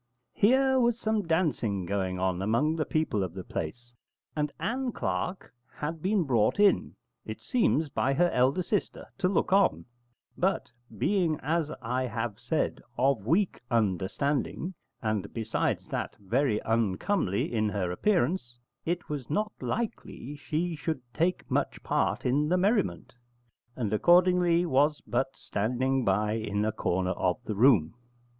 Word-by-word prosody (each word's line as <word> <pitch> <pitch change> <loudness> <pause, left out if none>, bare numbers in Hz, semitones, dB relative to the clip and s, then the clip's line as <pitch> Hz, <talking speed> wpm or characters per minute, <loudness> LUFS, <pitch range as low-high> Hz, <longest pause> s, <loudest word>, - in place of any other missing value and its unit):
Here 265 +4 +4
was 240 -1 +2
some 215 -5 0
dancing 140 - 0
going 95 -1 -1
on 90 0 0
among 120 +10 +1
the 155 - -1
people 155 -10 0
of 90 -1 -5
the 95 - -5
place, 120 +12 -6 0.4
and 150 -1 -1
Ann 255 +2 -1
Clark 185 - -3 0.2
had 155 +2 -4
been 195 +1 +2
brought 120 - +2
in, 205 -1 +3 0.3
it - - -7
seems, 215 - +1
by 135 0 0
her 175 +3 +3
elder 130 +8 +2
sister 205 +3 -2
to 180 - +2
look 190 0 +1
on; 195 0 +3 0.5
but 190 +2 0 0.3
being, 175 - +1
as 160 +1 0
I 125 +3 -1
have 115 -1 -4
said, 125 +6 -1 0.2
of 125 -5 +1
weak 180 +7 +2
understanding, 120 - 0 0.3
and, 105 -3 -1
besides 110 -1 -1
that, - - -3
very 110 +3 +1
uncomely 110 - 0
in 110 -2 +1
her 95 -3 -2
appearance, 165 - 0 0.3
it 175 +1 -2
was 145 -5 -5
not 210 +8 0
likely 210 - -4
she 160 +4 -2
should 155 -1 -3
take 170 +9 0
much - - -1
part - - 0
in 145 +4 +2
the 180 - +3
merriment; 185 - 0 0.6
and 110 -5 -2
accordingly 175 - +4
was 145 0 +2
but 135 0 -1
standing 125 +5 -1
by 105 +1 +1
in 105 -2 -1
a 110 - +1
corner 95 -3 -1
of 90 -1 0
the 110 - -3
room. 105 - +4
135 Hz, 145 wpm, -28 LUFS, 110-175 Hz, 0.6 s, Here